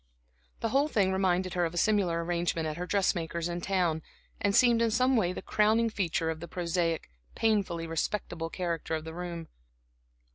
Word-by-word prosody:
The 225 - 0
whole 275 +5 +3
thing 200 -10 +2
reminded 185 -1 +1
her 180 - +1
of 170 0 -2
a - - -4
similar 180 -4 +2
arrangement 170 -1 -1
at 155 - -3
her 180 +1 -4
dressmaker's 170 -4 0
in 175 0 -3
town, 175 -4 +1 0.4
and 200 0 +1
seemed 240 -2 +5
in 230 - +3
some 255 +4 +3
way 185 -7 +2
the 185 - -6
crowning 220 +2 +2
feature 170 -5 0
of 160 - -6
the 170 - -7
prosaic, 170 - -1 0.2
painfully 195 -7 +1
respectable 165 0 -2
character 170 -2 -2
of 155 - -4
the 160 0 -7
room. 170 -1 -5
175 Hz, 180 wpm, -29 LUFS, 165-205 Hz, 0.4 s, seemed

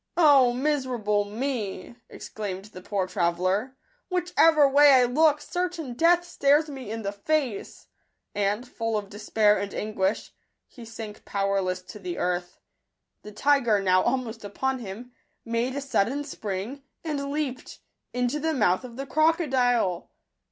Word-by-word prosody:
" - - -45 0.2
O 255 -3 +5
miserable 245 -6 0
me! 215 -3 -4
" - - -51
exclaimed 200 -3 -6
the 185 - -9
poor 195 0 -1
tra 175 -2 +1
veller; 190 +9 -1 0.2
" - - -41
whichever 330 -4 +4
way 290 +2 +6
I 255 -1 +6
look, 295 +4 +3
certain 350 -7 -3
death 340 +6 +3
stares 295 -2 +2
me 270 -6 -8
in 225 0 -5
the 200 - -2
face;" 245 +1 -2 0.5
and, 205 +4 -1
full 225 -2 -2
of 205 -1 -5
despair 210 0 +2
and 200 0 -4
anguish, 210 -1 -2 0.3
he 240 -3 -13
sank 220 -2 -9
powerless 195 -2 -1
to 210 - -11
the 180 -3 -5
earth. 175 0 -2 0.6
The 210 - -10
tiger, 240 -2 +2
now 185 -1 +3
almost 235 -3 -2
upon 260 +6 -2
him, 230 +3 -8 0.3
made 235 +3 -1
a 285 - -2
sudden 270 +1 0
spring, 220 +1 -5 0.2
and 285 -3 -3
leaped 285 -4 -4 0.2
— - - -55
into 250 +4 -1
the 320 +1 -1
mouth 200 -4 +2
of 245 -2 -9
the 275 - -4
crocodile 260 - +1
240 Hz, 155 wpm, -26 LUFS, 200-280 Hz, 0.6 s, way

